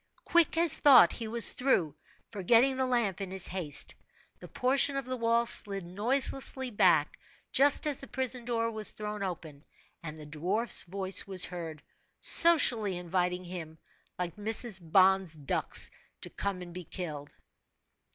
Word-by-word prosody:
Quick 340 Hz, -2 st, +1 dB
as 335 Hz, -2 st, +3 dB
thought 260 Hz, -12 st, +6 dB
he 230 Hz, -, -6 dB
was 230 Hz, +1 st, +3 dB
through, 180 Hz, -, -1 dB, 0.4 s
forgetting 230 Hz, +6 st, +2 dB
the 260 Hz, 0 st, -2 dB
lamp 230 Hz, -7 st, -1 dB
in 195 Hz, -, -5 dB
his 190 Hz, -1 st, +2 dB
haste. 170 Hz, -6 st, 0 dB, 0.5 s
The -, -, -12 dB
portion 275 Hz, +2 st, 0 dB
of 275 Hz, -, -4 dB
the 255 Hz, 0 st, -5 dB
wall 230 Hz, 0 st, 0 dB
slid 195 Hz, -5 st, -1 dB
noiselessly 260 Hz, +6 st, -3 dB
back, 205 Hz, -, +1 dB, 0.3 s
just 285 Hz, +2 st, +3 dB
as 295 Hz, -3 st, -1 dB
the 275 Hz, -, -11 dB
prison 260 Hz, -2 st, -4 dB
door 230 Hz, -1 st, -2 dB
was 215 Hz, -1 st, -1 dB
thrown 210 Hz, -1 st, -7 dB
open, 160 Hz, -6 st, -7 dB, 0.4 s
and 160 Hz, -2 st, -9 dB
the 155 Hz, -, -11 dB
dwarfs 180 Hz, +10 st, +1 dB
voice 190 Hz, +2 st, -2 dB
was 190 Hz, -2 st, +3 dB
heard, 165 Hz, -4 st, -9 dB, 0.4 s
socially 240 Hz, -, +5 dB
inviting 180 Hz, +1 st, -3 dB
him, 170 Hz, -3 st, -9 dB, 0.4 s
like 175 Hz, 0 st, -5 dB
Mrs. 215 Hz, 0 st, -1 dB
Bond's 185 Hz, +1 st, +2 dB
ducks, 145 Hz, -3 st, -1 dB, 0.3 s
to -, -, -8 dB
come 195 Hz, -2 st, -5 dB
and 175 Hz, -1 st, -12 dB
be 180 Hz, 0 st, -8 dB
killed. 155 Hz, -5 st, -8 dB
200 Hz, 150 wpm, -29 LUFS, 175-245 Hz, 0.5 s, thought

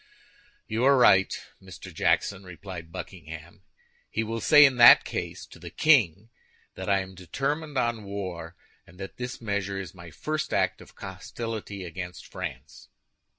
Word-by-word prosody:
"You 110 Hz, +2 st, -2 dB
are 140 Hz, 0 st, +6 dB
right, 95 Hz, -6 st, +5 dB, 0.3 s
Mr. 95 Hz, -2 st, -11 dB
Jackson," 100 Hz, -1 st, +1 dB
replied 90 Hz, -2 st, -9 dB
Buckingham. 85 Hz, -2 st, -9 dB, 0.5 s
"He 110 Hz, -, -1 dB
will 115 Hz, +1 st, -4 dB
say, 150 Hz, +3 st, +8 dB
in 130 Hz, -3 st, +2 dB
that 120 Hz, -1 st, +9 dB
case, -, -, -5 dB
to -, -, -15 dB
the -, -, -9 dB
king 115 Hz, -, +3 dB, 0.4 s
that -, -, -6 dB
I 100 Hz, -1 st, +3 dB
am 95 Hz, 0 st, -9 dB
determined 140 Hz, -, -3 dB
on 120 Hz, -3 st, 0 dB
war, 95 Hz, -4 st, -6 dB, 0.3 s
and 90 Hz, +2 st, -18 dB
that 95 Hz, -, -8 dB
this 125 Hz, +1 st, -5 dB
measure 100 Hz, -3 st, -2 dB
is 90 Hz, -4 st, -7 dB
my 85 Hz, -2 st, -11 dB
first 150 Hz, -, -3 dB
act -, -, 0 dB
of -, -, -14 dB
hostility 110 Hz, -4 st, -6 dB
against 90 Hz, +1 st, -7 dB
France." -, -, -8 dB
100 Hz, 150 wpm, -27 LUFS, 90-120 Hz, 0.5 s, that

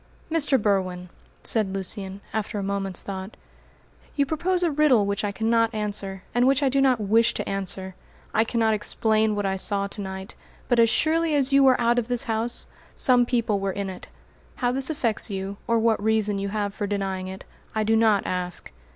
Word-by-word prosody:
"Mr. 290 Hz, -5 st, +2 dB
Berwin," 185 Hz, -4 st, -1 dB, 0.3 s
said 215 Hz, -4 st, 0 dB
Lucian, 195 Hz, 0 st, -5 dB
after 220 Hz, 0 st, -2 dB
a 200 Hz, -, -2 dB
moment's 195 Hz, -2 st, -2 dB
thought, 190 Hz, +1 st, -6 dB, 0.8 s
"you 285 Hz, -, +2 dB
propose 350 Hz, +5 st, 0 dB
a 340 Hz, -, +2 dB
riddle 280 Hz, -8 st, +4 dB
which 200 Hz, +1 st, -2 dB
I 205 Hz, -, 0 dB
cannot 225 Hz, +2 st, +1 dB
answer, 200 Hz, -2 st, -3 dB
and 245 Hz, +1 st, +3 dB
which 275 Hz, +1 st, +3 dB
I 275 Hz, -, +3 dB
do 275 Hz, +1 st, +2 dB
not 260 Hz, -3 st, +3 dB
wish 220 Hz, +3 st, +2 dB
to -, -, -3 dB
answer. 190 Hz, -1 st, -3 dB, 0.4 s
I 220 Hz, -, +4 dB
cannot 225 Hz, -1 st, +1 dB
explain 215 Hz, 0 st, +1 dB
what 205 Hz, -1 st, -1 dB
I 190 Hz, 0 st, 0 dB
saw 200 Hz, +1 st, -1 dB
to 200 Hz, +1 st, -3 dB
night, 190 Hz, +1 st, -7 dB, 0.3 s
but 245 Hz, -2 st, +2 dB
as 230 Hz, -1 st, +6 dB
surely 320 Hz, +3 st, +1 dB
as 275 Hz, -1 st, +1 dB
you 275 Hz, 0 st, +6 dB
were 260 Hz, -2 st, +5 dB
out 240 Hz, +1 st, +3 dB
of 230 Hz, -, -4 dB
this 245 Hz, -1 st, 0 dB
house, 225 Hz, +1 st, -1 dB, 0.3 s
some 245 Hz, -2 st, +4 dB
people 230 Hz, -5 st, +1 dB
were 195 Hz, 0 st, -1 dB
in 200 Hz, 0 st, -3 dB
it. 185 Hz, -, -10 dB, 0.5 s
How 245 Hz, -1 st, 0 dB
this 265 Hz, +3 st, 0 dB
affects 235 Hz, -8 st, +1 dB
you, 195 Hz, 0 st, -4 dB
or 230 Hz, -, +3 dB
what 225 Hz, -2 st, +2 dB
reason 215 Hz, -2 st, +1 dB
you 200 Hz, 0 st, -2 dB
have 205 Hz, -1 st, -2 dB
for 205 Hz, -, -3 dB
denying 195 Hz, -2 st, -2 dB
it, 190 Hz, 0 st, -8 dB, 0.3 s
I 220 Hz, -, +1 dB
do 220 Hz, +1 st, +2 dB
not 220 Hz, -3 st, +3 dB
ask. 180 Hz, -, -3 dB
215 Hz, 200 wpm, -25 LUFS, 195-245 Hz, 0.8 s, as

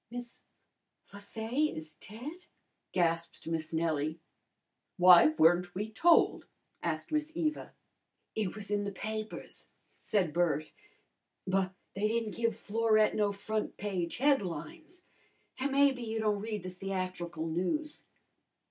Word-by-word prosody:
"Miss 240 Hz, 0 st, -8 dB, 0.7 s
Le 200 Hz, -, -8 dB
Fay 225 Hz, +8 st, -1 dB
is 155 Hz, 0 st, -8 dB
dead?" 285 Hz, -, -9 dB, 0.4 s
gasped 170 Hz, -2 st, 0 dB
Miss 160 Hz, -1 st, -2 dB
Nellie. 160 Hz, -1 st, 0 dB, 0.8 s
"Why 180 Hz, -2 st, +9 dB
weren't 175 Hz, +2 st, +4 dB
we 210 Hz, +3 st, -3 dB
told?" 330 Hz, +10 st, +4 dB, 0.3 s
asked 160 Hz, -, -3 dB
Miss 305 Hz, 0 st, 0 dB
Eva. 310 Hz, -3 st, -2 dB, 0.6 s
"It 210 Hz, -4 st, -2 dB
was 210 Hz, -1 st, -7 dB
in 205 Hz, 0 st, +1 dB
the 200 Hz, -, -3 dB
papers," 215 Hz, +2 st, -6 dB, 0.3 s
said 185 Hz, -7 st, 0 dB
Bert. 160 Hz, -3 st, +1 dB, 0.7 s
"But 190 Hz, 0 st, 0 dB, 0.2 s
they 205 Hz, +2 st, 0 dB
didn't 225 Hz, -1 st, -1 dB
give 230 Hz, -2 st, 0 dB
Florette 215 Hz, 0 st, +2 dB
no 205 Hz, -1 st, +2 dB
front 215 Hz, +2 st, -3 dB
page 185 Hz, -5 st, -2 dB
headlines, 290 Hz, -, -1 dB, 0.6 s
an' 275 Hz, +2 st, 0 dB
maybe 275 Hz, -2 st, +4 dB
you 225 Hz, -1 st, -3 dB
don't 210 Hz, -2 st, +1 dB
read 215 Hz, -3 st, -4 dB
the 185 Hz, -, -5 dB
theatrical 185 Hz, -3 st, -4 dB
news." 185 Hz, -, -2 dB
205 Hz, 125 wpm, -31 LUFS, 175-230 Hz, 0.8 s, Why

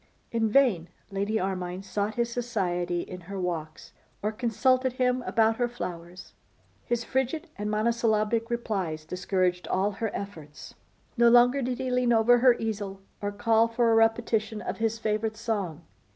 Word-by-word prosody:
In 225 Hz, -1 st, +1 dB
vain 215 Hz, -9 st, +3 dB, 0.2 s
Lady 200 Hz, +3 st, -1 dB
Armine 185 Hz, 0 st, -3 dB
sought 205 Hz, +2 st, -2 dB
his 235 Hz, -1 st, 0 dB
society 180 Hz, -8 st, -1 dB
in 180 Hz, 0 st, -8 dB
her 195 Hz, +3 st, -7 dB
walks, 160 Hz, -4 st, -4 dB, 0.3 s
or 210 Hz, -, +1 dB
consulted 250 Hz, +3 st, +1 dB
him 250 Hz, 0 st, +1 dB
about 225 Hz, 0 st, +2 dB
her 245 Hz, -, +1 dB
flowers. 180 Hz, -6 st, -7 dB, 0.5 s
His 240 Hz, -1 st, -1 dB
frigid 265 Hz, +7 st, -2 dB
and 210 Hz, +1 st, -3 dB
monosyllabic 225 Hz, +1 st, +1 dB
replies 190 Hz, -10 st, -2 dB
discouraged 180 Hz, +1 st, -1 dB
all 195 Hz, +2 st, +1 dB
her 220 Hz, +2 st, -3 dB
efforts. 160 Hz, -7 st, -8 dB, 0.4 s
No 235 Hz, 0 st, +6 dB
longer 245 Hz, +3 st, +5 dB
did 250 Hz, -1 st, -2 dB
he 260 Hz, -1 st, -3 dB
lean 250 Hz, -1 st, +2 dB
over 235 Hz, +2 st, +5 dB
her 250 Hz, -1 st, +6 dB
easel, 205 Hz, -4 st, -4 dB, 0.2 s
or 205 Hz, 0 st, -2 dB
call 225 Hz, +2 st, +3 dB
for 230 Hz, 0 st, +2 dB
a -, -, +4 dB
repetition 225 Hz, -1 st, +2 dB
of -, -, -4 dB
his 225 Hz, 0 st, 0 dB
favourite 220 Hz, 0 st, -1 dB
song. 195 Hz, -8 st, -3 dB
220 Hz, 155 wpm, -27 LUFS, 190-235 Hz, 0.5 s, No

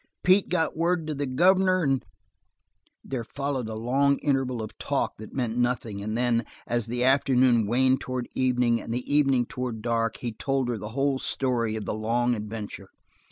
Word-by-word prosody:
Pete 185 Hz, +2 st, +4 dB
got 165 Hz, -3 st, 0 dB
word 170 Hz, 0 st, +1 dB
to 155 Hz, -, -3 dB
the 140 Hz, -1 st, -3 dB
governor, 185 Hz, +6 st, +3 dB
an' 135 Hz, -3 st, +1 dB, 0.5 s
" 90 Hz, +1 st, -45 dB
There 130 Hz, -3 st, -3 dB
followed 135 Hz, -1 st, -3 dB
a 110 Hz, -, -5 dB
long 135 Hz, +5 st, +2 dB
interval 135 Hz, -3 st, 0 dB
of 110 Hz, -, -8 dB
talk -, -, -1 dB
that 110 Hz, -, -9 dB
meant 120 Hz, -3 st, -1 dB
nothing, 120 Hz, -4 st, -1 dB
and 110 Hz, +2 st, -3 dB
then, 120 Hz, -1 st, +2 dB, 0.2 s
as 120 Hz, -2 st, -1 dB
the 120 Hz, +1 st, -1 dB
afternoon 130 Hz, -4 st, +4 dB
waned 130 Hz, +3 st, +3 dB
towards 125 Hz, -1 st, -4 dB
evening, 125 Hz, -2 st, +2 dB
and -, -, -7 dB
the 125 Hz, +4 st, -3 dB
evening 135 Hz, -4 st, +3 dB
toward 120 Hz, -3 st, -5 dB
dark, 115 Hz, -1 st, 0 dB
he 120 Hz, -, -4 dB
told 135 Hz, +3 st, -1 dB
her 115 Hz, -3 st, -2 dB
the 105 Hz, -, -6 dB
whole 135 Hz, -1 st, +1 dB
story 120 Hz, -6 st, -1 dB
of 110 Hz, -, -4 dB
the -, -, -2 dB
long 120 Hz, +3 st, +1 dB
adventure. 105 Hz, -3 st, -6 dB
125 Hz, 185 wpm, -26 LUFS, 115-135 Hz, 0.5 s, Pete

